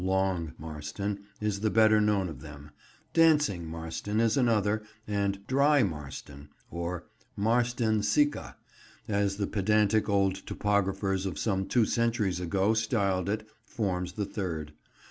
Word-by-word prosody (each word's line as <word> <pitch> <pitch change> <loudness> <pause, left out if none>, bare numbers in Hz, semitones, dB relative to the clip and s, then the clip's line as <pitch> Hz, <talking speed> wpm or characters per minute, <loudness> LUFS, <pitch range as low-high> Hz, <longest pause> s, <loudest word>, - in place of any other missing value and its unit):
"Long" 95 -4 0
Marston 80 +7 -5
is 105 -2 -1
the 110 +1 +1
better 110 0 +5
known 105 -3 +2
of 75 -6 -8
them; 75 -1 -11 0.4
"Dancing" 150 - +3
Marston 80 +6 -3
is 115 -1 +3
another, 110 -4 +2 0.3
and 100 -1 -1
"Dry" 140 +3 +4
Marston—or 75 +2 -6 0.3
"Marston 115 0 +1
Sicca," 145 +9 +1 0.5
as 100 -2 0
the 100 - 0
pedantic 105 +1 +2
old 100 -1 +3
topographers 95 -1 0
of 85 -6 -5
some 95 +1 -1
two 120 -3 +3
centuries 115 -5 0
ago 95 +4 +1
styled 100 -4 0
it 110 +1 -2 0.2
forms 90 -6 -2
the 105 0 -2
third. 80 -7 -4
100 Hz, 125 wpm, -29 LUFS, 90-110 Hz, 0.5 s, better